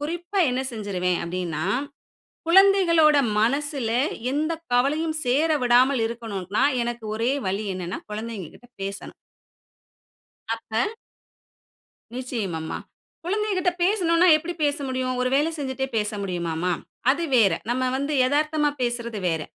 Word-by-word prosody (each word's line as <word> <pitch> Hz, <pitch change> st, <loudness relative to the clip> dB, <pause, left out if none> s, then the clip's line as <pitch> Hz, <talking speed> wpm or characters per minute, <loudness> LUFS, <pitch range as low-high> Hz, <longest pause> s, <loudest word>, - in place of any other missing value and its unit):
குறிப்பா 345 Hz, +6 st, -3 dB
என்ன 250 Hz, +1 st, -1 dB
செஞ்சுருவேன் 185 Hz, -5 st, -1 dB
அப்படின்னா, 170 Hz, -3 st, -3 dB, 0.8 s
குழந்தைகளோட 340 Hz, -4 st, +6 dB, 0.2 s
மனசில 275 Hz, +1 st, 0 dB, 0.4 s
எந்த 310 Hz, +3 st, 0 dB, 0.2 s
கவலையும் 305 Hz, +6 st, +1 dB
சேர 285 Hz, +6 st, +2 dB
விடாமல் 250 Hz, +1 st, +4 dB
இருக்கக்கணும்னா, 220 Hz, -2 st, -2 dB, 0.2 s
எனக்கு 235 Hz, -1 st, -4 dB
ஒரே 230 Hz, +3 st, +1 dB, 0.2 s
வழி 195 Hz, +3 st, -1 dB
என்னன்னா 180 Hz, -1 st, -4 dB
குழந்தைங்ககிட்ட 220 Hz, 0 st, -7 dB, 0.2 s
பேசணும். 200 Hz, +1 st, -6 dB, 1.4 s
அப்ப 225 Hz, -, -2 dB, 1.3 s
நிச்சயமாம்மா. 205 Hz, -11 st, -3 dB, 0.5 s
குழந்தைகள்ட்ட 390 Hz, -2 st, 0 dB
பேசணும்னா, 355 Hz, -3 st, +3 dB
எப்படி 335 Hz, +3 st, -5 dB
பேச 290 Hz, 0 st, +2 dB
முடியும்? 255 Hz, -1 st, -1 dB
ஒரு 255 Hz, -, +1 dB
வேலை 295 Hz, +4 st, +3 dB
செஞ்சுட்டே 265 Hz, -2 st, -3 dB
பேச 210 Hz, 0 st, 0 dB
முடியுமாம்மா? 175 Hz, -1 st, -2 dB, 0.4 s
அது 335 Hz, +5 st, 0 dB
வேற. 205 Hz, -6 st, +5 dB, 0.2 s
நம்ம 255 Hz, +2 st, 0 dB
வந்து 280 Hz, +2 st, -2 dB
எதார்த்தமா 295 Hz, +2 st, +1 dB
பேசுறது 235 Hz, -2 st, -2 dB
வேற. 160 Hz, -2 st, -1 dB
250 Hz, 110 wpm, -24 LUFS, 210-305 Hz, 1.4 s, குழந்தைகளோட